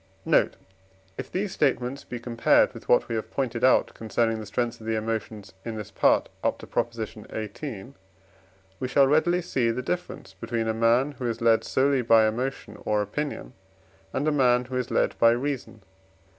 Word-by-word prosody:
Note. - - +3 0.6
If - - -7
these 195 +1 -2
statements 135 -1 0
be 120 - -7
compared 115 0 +3
with - - -12
what - - +4
we - - -4
have 110 -1 -3
pointed 120 -4 -2
out 130 - +4
concerning 115 0 -1
the 110 - -7
strength 115 +3 -2
of 110 - -9
the 110 - 0
emotions 110 -2 -4
in 115 -1 -5
this 105 -2 -7
Part - - +3 0.2
up - - +1
to - - -11
Prop. 120 - -1
xviii., 110 +2 -7 0.9
we 130 - -2
shall 135 +2 +4
readily 170 +5 +2
see 125 -8 0
the 120 +2 -2
difference 175 - -4
between 115 +4 -3
a 110 - +1
man, 115 +5 +3
who 125 - -2
is 115 -1 -2
led 115 -1 +3
solely 135 0 +2
by 115 -2 +5
emotion 125 +5 -3
or 105 -1 +1
opinion, 105 - -5 0.6
and 145 - -1
a - - +3
man, 125 -3 +3
who 130 +1 -6
is 125 -1 -1
led - - +1
by 115 - +7
reason. 125 -4 -4
120 Hz, 185 wpm, -26 LUFS, 110-135 Hz, 0.9 s, by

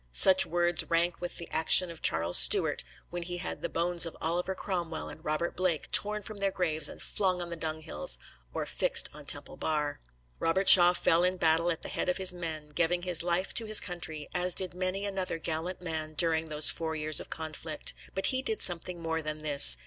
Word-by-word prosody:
Such 185 - +7
words 175 0 0
rank 170 +1 -1
with 175 - -7
the 170 - -8
action 170 +2 +3
of 165 - -14
Charles 85 +2 0
Stuart, - - +3 0.3
when 175 0 -5
he 175 +1 -6
had 175 - -7
the 170 - -4
bones 170 0 0
of 165 - -5
Oliver 175 +3 -3
Cromwell 170 -5 -5
and 160 - -14
Robert 155 +3 -4
Blake 180 -4 -3
torn 210 0 +2
from 215 0 -10
their 200 0 0
graves 160 -5 -1
and - - -12
flung 185 -3 0
on 175 -1 -6
dunghills 155 - -4 0.3
or - - -5
fixed - - +2
on - - -13
Temple - - -3
Bar. 150 -2 -4 0.4
Robert 190 +4 -1
Shaw 175 -1 +11
fell 170 -1 +1
in 180 +1 0
battle 165 0 +1
at 165 - -5
the - - -6
head - - -4
of 180 - -1
his 185 -1 +2
men, 160 -4 -7
giving 175 +3 -1
his 180 -3 +1
life 175 +2 -2
to 230 - 0
his 215 -1 +6
country, 160 -5 -7
as 180 0 0
did 185 -2 -2
many 185 +2 -4
another 190 -4 -4
gallant 165 +3 -5
man 155 -2 -6
during 160 0 +1
those 150 -1 +6
four 160 -1 -5
years 155 0 0
of - - -11
conflict. 160 -1 -3 0.2
But 190 - -2
he 260 - -2
did 435 +10 -4
something 175 0 -3
more 160 0 -3
than 155 0 -6
this. 145 - +7
170 Hz, 210 wpm, -28 LUFS, 160-180 Hz, 0.4 s, Shaw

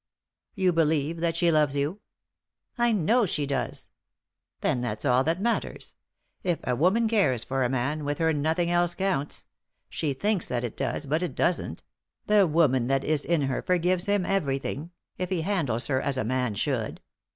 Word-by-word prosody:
" - - -65
You 185 -3 +2
believe 160 0 +1
that 165 -1 0
she 170 0 +3
loves 150 -3 +2
you." 145 +8 -1 0.4
" - - -64 0.3
I 240 0 +4
know 220 +3 +3
she 150 -3 -1
does," 135 -4 -3 0.7
"Then 125 - +1
that's 110 -2 -3
all 130 -1 +4
that 165 +3 0
matters. 235 +3 -2 0.5
If 175 -3 +1
a 125 - 0
woman 190 - +3
cares 190 - +2
for 135 0 -1
a 125 - +1
man, 135 +4 -1
with 145 0 -2
her 160 -1 +2
nothing 160 +4 0
else 175 0 +2
counts; 170 -7 -2 0.4
she 150 -4 -2
thinks 205 +6 0
that 120 -1 -2
it 120 - -4
does, 135 +2 -2
but 155 +4 0
it 180 - -3
doesn't; 175 - -1 0.4
the 210 -3 +4
woman 145 -6 +2
that 135 0 +1
is 150 -2 0
in 170 -4 +1
her 135 -2 -1
forgives 180 +1 +1
him 200 -2 +1
everything 145 -4 -1
— - - -52
if 180 -1 -2
he 185 -3 0
handles 160 - -1
her 130 -2 0
as 140 -2 0
a 130 - 0
man 125 -1 -1
should. 115 0 -2
155 Hz, 190 wpm, -27 LUFS, 135-180 Hz, 0.7 s, I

